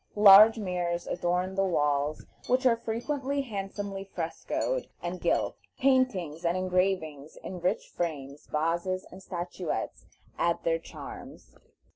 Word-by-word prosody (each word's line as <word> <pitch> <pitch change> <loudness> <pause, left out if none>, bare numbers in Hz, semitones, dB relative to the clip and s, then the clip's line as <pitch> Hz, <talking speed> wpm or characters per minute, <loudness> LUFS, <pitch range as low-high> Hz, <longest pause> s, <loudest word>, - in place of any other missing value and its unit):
Large 210 +2 +9
mirrors 180 -4 -2
adorn 180 +2 -1
the 195 0 +1
walls, 150 -4 0 0.2
which 255 +1 +2
are 240 -2 +6
frequently 270 +5 -2
handsomely 200 -3 -5
frescoed 195 - -3
and 175 +1 -5
gilt. - - +1 0.2
Paintings 240 - +1
and 170 +1 +1
engravings 180 -5 -1
in 185 - -6
rich 180 +1 -1
frames, 145 -4 -4
vases 170 +4 -1
and 190 - -11
statuettes, 175 -1 -4 0.3
add - - +1
their - - +1
charms. - - -10
185 Hz, 120 wpm, -29 LUFS, 170-215 Hz, 0.3 s, Large